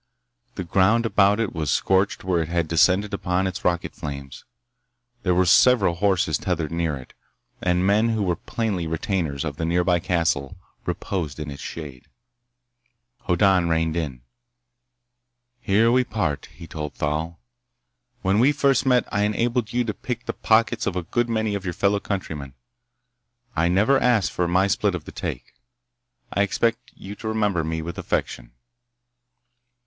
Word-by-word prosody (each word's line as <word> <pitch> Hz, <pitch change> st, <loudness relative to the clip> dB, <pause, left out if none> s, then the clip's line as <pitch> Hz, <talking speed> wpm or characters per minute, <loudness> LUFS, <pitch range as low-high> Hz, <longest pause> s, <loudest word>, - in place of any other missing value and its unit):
The 95 Hz, -, -3 dB
ground 100 Hz, +6 st, +3 dB
about 105 Hz, -1 st, +3 dB
it 115 Hz, -3 st, -1 dB
was 80 Hz, -3 st, -2 dB
scorched 95 Hz, +7 st, +1 dB
where 90 Hz, -3 st, +1 dB
it 80 Hz, -, -3 dB
had 85 Hz, -2 st, 0 dB
descended 95 Hz, +5 st, +3 dB
upon 95 Hz, -1 st, 0 dB
its 95 Hz, -2 st, -4 dB
rocket 85 Hz, -1 st, 0 dB
flames. 70 Hz, -4 st, -7 dB, 0.8 s
There 90 Hz, -4 st, +1 dB
were 90 Hz, +1 st, +3 dB
several 100 Hz, 0 st, +5 dB
horses 85 Hz, -4 st, +1 dB
tethered 85 Hz, -4 st, -2 dB
near 85 Hz, -3 st, -1 dB
it, 65 Hz, -, -13 dB, 0.5 s
and 90 Hz, 0 st, +1 dB
men 105 Hz, +4 st, +3 dB
who 110 Hz, -2 st, 0 dB
were 90 Hz, -3 st, +1 dB
plainly 100 Hz, -4 st, -3 dB
retainers 80 Hz, -, -2 dB
of 75 Hz, -2 st, -4 dB
the -, -, -3 dB
nearby 85 Hz, +1 st, +2 dB
castle 85 Hz, -6 st, -1 dB, 0.3 s
reposed 80 Hz, -8 st, -3 dB
in 75 Hz, -1 st, -5 dB
its 70 Hz, -, -9 dB
shade. 70 Hz, -6 st, -8 dB, 1.2 s
Hoddan 90 Hz, -1 st, +3 dB
reined 80 Hz, 0 st, +1 dB
in. 70 Hz, -8 st, -4 dB, 1.4 s
"Here 115 Hz, 0 st, +3 dB
we 125 Hz, +1 st, +4 dB
part," 105 Hz, -, -2 dB
he -, -, -12 dB
told 75 Hz, -2 st, -6 dB
Thal. 80 Hz, +3 st, -2 dB, 0.8 s
"When 95 Hz, +2 st, +2 dB
we 130 Hz, +5 st, +5 dB
first 140 Hz, -2 st, +2 dB
met 125 Hz, -2 st, +3 dB
I 105 Hz, -, +1 dB
enabled 115 Hz, +2 st, 0 dB
you 125 Hz, +1 st, +1 dB
to 110 Hz, -2 st, -3 dB
pick 125 Hz, +2 st, -5 dB
the -, -, -3 dB
pockets 110 Hz, 0 st, +2 dB
of 95 Hz, -, -1 dB
a 90 Hz, -, -2 dB
good 120 Hz, +7 st, -1 dB
many 110 Hz, -2 st, 0 dB
of 100 Hz, -2 st, -3 dB
your 90 Hz, -3 st, -4 dB
fellow 100 Hz, +1 st, +2 dB
countrymen. 75 Hz, -10 st, -5 dB, 1.0 s
I 85 Hz, -, +2 dB
never 105 Hz, +10 st, +3 dB
asked 120 Hz, -6 st, +2 dB
for 90 Hz, -, -1 dB
my 90 Hz, +3 st, +3 dB
split 100 Hz, -1 st, +1 dB
of 80 Hz, -4 st, -7 dB
the -, -, -9 dB
take. -, -, -6 dB, 0.8 s
I 100 Hz, -, +2 dB
expect 115 Hz, +4 st, 0 dB
you 100 Hz, -, -9 dB
to 110 Hz, -, -7 dB
remember 105 Hz, -6 st, 0 dB
me 80 Hz, 0 st, -3 dB
with 85 Hz, +1 st, -6 dB
affection." -, -, -3 dB
90 Hz, 160 wpm, -23 LUFS, 80-105 Hz, 1.4 s, several